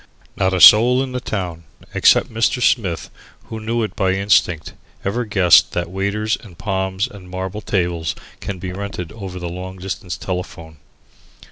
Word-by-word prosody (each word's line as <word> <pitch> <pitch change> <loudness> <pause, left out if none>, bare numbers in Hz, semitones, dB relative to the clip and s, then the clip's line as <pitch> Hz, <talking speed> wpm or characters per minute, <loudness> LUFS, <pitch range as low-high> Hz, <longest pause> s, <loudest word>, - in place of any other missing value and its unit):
Not 95 0 +1
a 95 - 0
soul 125 +7 +8
in 130 - -6
the 125 - -3
town 90 -8 -4 0.3
except - - +4
Mr. 115 +3 +1
Smith, 100 -8 0 0.3
who 110 - -7
knew 115 +1 -1
it 110 - -4
by 95 -2 +1
instinct, 95 -4 +1 0.3
ever 115 +5 -1
guessed 95 -5 +5
that 85 0 -2
waiters 100 +3 -1
and 90 -7 -14
palms 95 0 -1
and 95 -3 -13
marble 95 +3 -5
tables 85 -5 -1 0.2
can 100 - -5
be 90 0 -6
rented 95 -3 -6
over 95 -4 -8
the 90 -1 -5
long 90 +2 -7
distance 95 0 -5
telephone. 90 -3 -6
95 Hz, 160 wpm, -20 LUFS, 90-105 Hz, 0.3 s, soul